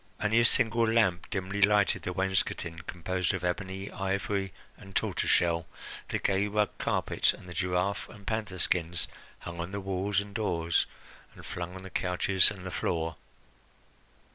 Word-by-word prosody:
Only 110 +2 +3
a 120 - +5
single 115 -1 +4
lamp 95 -6 +2
dimly 95 0 -2
lighted 105 0 +4
the 90 - -3
wainscoting, 95 -3 0
composed 90 +2 -1
of 95 - -5
ebony, 95 +2 -2
ivory, 95 0 -1 0.2
and 95 -1 -14
tortoise - - 0
shell, 85 -1 +3 0.4
the - - 0
gay 100 +1 +1
rug 105 0 +1
carpet, - - +2
and - - -13
the 90 - -7
giraffe 95 +1 0
and 100 -3 -13
panther 105 -3 -2
skins 85 -1 +1 0.3
hung 85 0 -7
on 85 +2 -3
the 100 - -2
walls 95 +1 0
and 100 0 -6
doors 85 -6 +1 0.5
and - - -12
flung 90 +1 -5
on 95 - -8
the 95 - -9
couches 90 +1 +3
and 95 -3 -8
the 95 - -4
floor. 80 -2 -1
95 Hz, 165 wpm, -30 LUFS, 90-100 Hz, 0.5 s, a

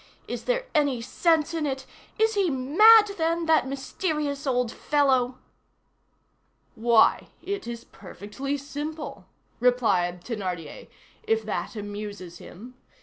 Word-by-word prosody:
Is - - -5
there - - 0
any 285 -5 +2
sense 320 +6 +1
in 315 -3 -1
it? 265 -1 -4 0.3
Is 445 +1 +2
he 395 -4 +1
mad, 410 - +6
then, 330 +1 0
that 315 -5 +3
mysterious 285 +1 -3
old 250 -3 +1
fellow?" 260 -4 +1 1.4
"Why! 230 0 +3 0.2
it 400 -9 -4
is 235 -1 -6
perfectly 215 +9 -6
simple," 295 +3 -7 0.3
replied 220 -8 +1
Thénardier, 185 -9 -5 0.3
"if 445 0 0
that - - -4
amuses 205 -4 -7
him! 235 +8 -12
270 Hz, 115 wpm, -26 LUFS, 230-320 Hz, 1.4 s, mad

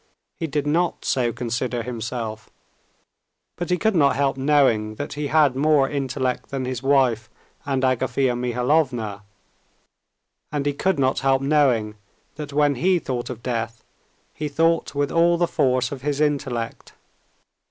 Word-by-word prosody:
He 165 - -3
did 145 -1 -2
not 170 +4 0
so 120 -3 +1
consider 120 0 -3
himself, 115 -2 -5 1.1
but 175 +1 -5
he 180 - +2
could 220 +1 +1
not 140 -4 +4
help 135 -1 +1
knowing 130 -6 +2
that 145 - -5
he 145 0 -3
had 145 -3 +3
more 145 0 +3
intellect 130 -2 -2
than 135 -2 -3
his 125 -1 -4
wife 130 -5 +2 0.4
and 135 -2 0
Agafea 130 0 +1
Mihalovna, 125 -3 0 1.3
and 145 -2 -2
he 145 - +1
could 190 +4 0
not 130 -1 +1
help 135 0 +2
knowing 130 -8 +2 0.4
that 150 -2 -7
when 145 0 +3
he 185 +1 +4
thought 125 -7 -4
of 120 -2 -7
death, 115 -2 -3 0.5
he 150 - -4
thought 165 0 +1
with 145 0 0
all 170 +1 +3
the 175 - +2
force 130 -3 +1
of 140 -3 -6
his 145 +1 -2
intellect. 140 -6 -2
135 Hz, 150 wpm, -23 LUFS, 125-150 Hz, 1.3 s, not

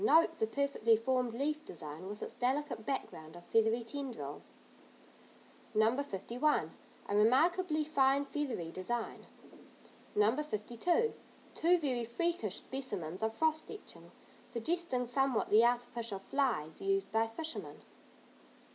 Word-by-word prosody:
Note 330 -4 +5
the 220 - +2
perfectly 235 -3 +2
formed 250 +1 +1
leaf 300 +4 -1
design 155 - -8
with 210 +1 -6
its - - -5
delicate 260 -2 -1
background 160 - -4
of 175 - -12
feathery 225 +1 +2
tendrils. 230 - -6 1.2
No. 220 +3 +4
51. 260 +4 0 0.4
A 205 - -1
remarkably 310 - +4
fine 280 -2 +3
feathery 270 - -3
design. 225 +7 -4 0.9
No. 210 +3 +4
52. 300 - 0 0.4
Two 350 +2 +4
very 260 -7 -1
freakish 235 - -1
specimens 190 -10 -4
of 220 0 0
frost 315 +2 +1
etchings. 425 - -10 0.3
Suggesting 260 +1 -1
somewhat 260 0 +1
the 215 +2 +7
artificial 240 -3 0
"flies" 195 - -1
used 390 0 0
by 225 +1 +2
fishermen. 315 +8 -6
245 Hz, 120 wpm, -34 LUFS, 220-300 Hz, 1.2 s, the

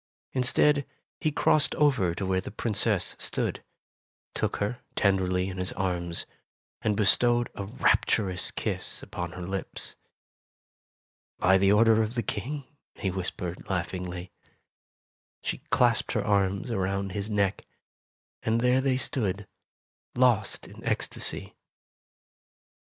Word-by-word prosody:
Instead, 140 +3 +3 0.3
he 155 - +1
crossed 150 0 +3
over 125 - +3
to 95 - -3
where 95 0 +1
the - - -7
Princess 105 -2 0
stood, - - -3 0.7
took - - -1
her 105 +5 -2 0.2
tenderly 95 -2 +2
in 95 -1 -5
his 90 - -2
arms 85 -2 -2 0.6
and 105 -2 +1
bestowed 120 +3 +3
a 100 - -5
rapturous 95 -2 +1
kiss - - -3
upon 85 -1 -5
her 90 - -6
lips. 95 +1 -3 1.4
"By 95 +1 +4
the 100 +1 +4
order 110 +1 +5
of 110 +2 -2
the 120 - 0
King," 130 +8 -3 0.3
he 95 -4 -2
whispered, 90 -1 -4
laugh 90 -3 -1
ingly. 90 -1 -5 1.1
She - - -2
clasped - - +3
her - - 0
arms 100 +2 +1
around 95 -1 -1
his 100 +2 -3
neck, 100 -2 0 0.7
and 115 +1 +1
there 125 +2 +3
they 130 -1 +2
stood, 105 -7 -1 0.7
lost 120 -5 +2
in - - -13
ecstasy. - - -1
100 Hz, 125 wpm, -28 LUFS, 95-115 Hz, 1.4 s, order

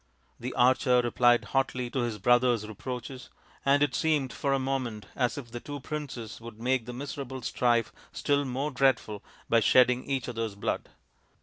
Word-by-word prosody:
The 125 +2 -4
archer 125 0 +4
replied 120 0 +3
hotly 130 -2 0
to 135 - -1
his 120 -3 -1
brother's 120 0 +3
reproaches, 125 +4 -7 0.3
and 140 +1 +4
it 145 - +1
seemed 150 -5 +1
for 140 - -1
a 135 - +3
moment 130 -6 -2
as 125 0 0
if 120 -5 -8
the 120 - -5
two 145 +3 -7
princes 130 -7 -6
would 115 -1 -10
make 125 0 0
the - - -4
miserable 130 -1 -6
strife 120 -1 +1 0.2
still 145 -1 +1
more 135 +3 -2
dreadful 130 -6 +1 0.2
by 115 - +4
shedding 125 +2 +4
each 135 -3 -2
other's 115 -4 -3
blood. 100 - -3
125 Hz, 170 wpm, -28 LUFS, 120-135 Hz, 0.3 s, archer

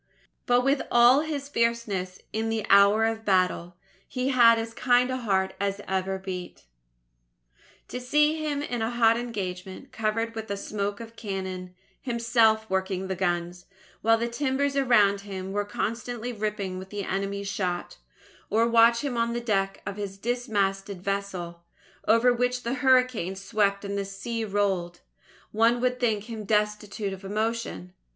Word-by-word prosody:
But 245 0 +4
with 275 +2 +2
all 240 +3 +6
his 295 -2 -3
fierceness 230 -8 -1 0.2
in 225 +1 -1
the 225 -2 -1
hour 200 +2 +6
of 225 0 -2
battle, 185 -3 +1 0.3
he 255 0 -2
had 235 -3 +6
as 225 0 -4
kind 245 +1 +3
a 255 - -1
heart 190 -6 0
as 200 0 -1
ever 190 0 -1
beat. 185 -2 -7 1.3
To 250 - -5
see 300 +4 +2
him 290 -2 -1
in 245 -5 -3
a 225 - 0
hot 230 -1 +4
engagement, 190 -6 -5
covered 225 +1 -1
with 220 -1 -6
the 200 -1 -3
smoke 200 +1 -3
of 230 0 -10
cannon, 190 -4 -5 0.3
himself 230 -3 +2
working 190 -1 -2
the 190 - -1
guns, 175 -1 -2 0.3
while 225 +1 +4
the 235 +1 -1
timbers 275 +3 -1
around 215 -7 +4
him 190 -2 -6
were 205 +1 -1
constantly 230 +3 -3
ripping 205 -4 -3
with 190 0 -9
the 205 0 -4
enemy's 200 +1 -3
shot; 185 -3 -3 0.5
or 225 +2 +3
watch 235 +1 +5
him 265 -4 -2
on 230 0 +1
the 240 - -1
deck 195 -4 -1
of 200 0 -5
his 200 -2 -5
dismasted 200 -5 -2
vessel, 190 -4 -4 0.4
over 230 +3 +5
which 245 +1 -1
the 235 - -1
hurricane 255 -8 +3
swept 200 0 0
and 200 0 -3
the 200 - -2
sea 210 +4 -4
rolled, 195 -4 -1 0.5
one 230 +2 +3
would 250 0 0
think 220 -5 +1
him 220 -1 -7
destitute 210 -1 -1
of 190 +1 -10
emotion. 210 - -3
215 Hz, 160 wpm, -26 LUFS, 195-235 Hz, 1.3 s, all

